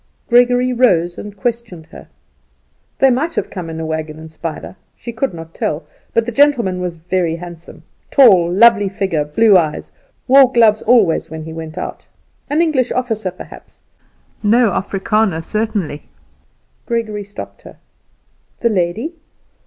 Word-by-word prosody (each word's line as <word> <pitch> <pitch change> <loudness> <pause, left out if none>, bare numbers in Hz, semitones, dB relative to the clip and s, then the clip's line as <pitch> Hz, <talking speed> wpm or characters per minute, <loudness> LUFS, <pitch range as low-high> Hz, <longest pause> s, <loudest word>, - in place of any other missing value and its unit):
Gregory 245 +1 +3
rose 175 -9 +2
and 205 -1 -9
questioned 225 -7 -4
her. - - -12 0.9
They 270 -1 +4
might 310 +7 -1
have - - -3
come 180 -4 -6
in 160 0 -6
a 160 - -4
wagon 160 -1 -4
and 160 0 -11
spider, 160 +2 -7 0.2
she 235 - -8
could 250 +4 -1
not 165 -1 -10
tell. 155 +2 -3 0.3
But 230 - +1
the 240 - -3
gentleman 235 -9 +2
was 180 -2 -3
very 170 0 -1
handsome, 170 -1 -11 0.3
tall, 185 -11 +5
lovely 205 +1 +5
figure, 190 -6 -1
blue 200 +8 +3
eyes, 155 -3 -4 0.4
wore 265 0 +6
gloves 225 -4 +4
always 215 -8 +2
when 160 0 -7
he 160 0 -8
went 160 -1 -8
out. - - -6 0.4
An 305 +4 +2
English 270 -7 0
officer, 225 -6 -2
perhaps; 180 - -13 0.6
no 225 +1 +3
Africander, 195 -2 -1
certainly. 210 -8 -3 0.8
Gregory 220 -3 -2
stopped 200 +1 -10
her. - - -14 0.8
The 235 - +2
lady? 205 - -1
205 Hz, 145 wpm, -17 LUFS, 170-235 Hz, 0.9 s, wore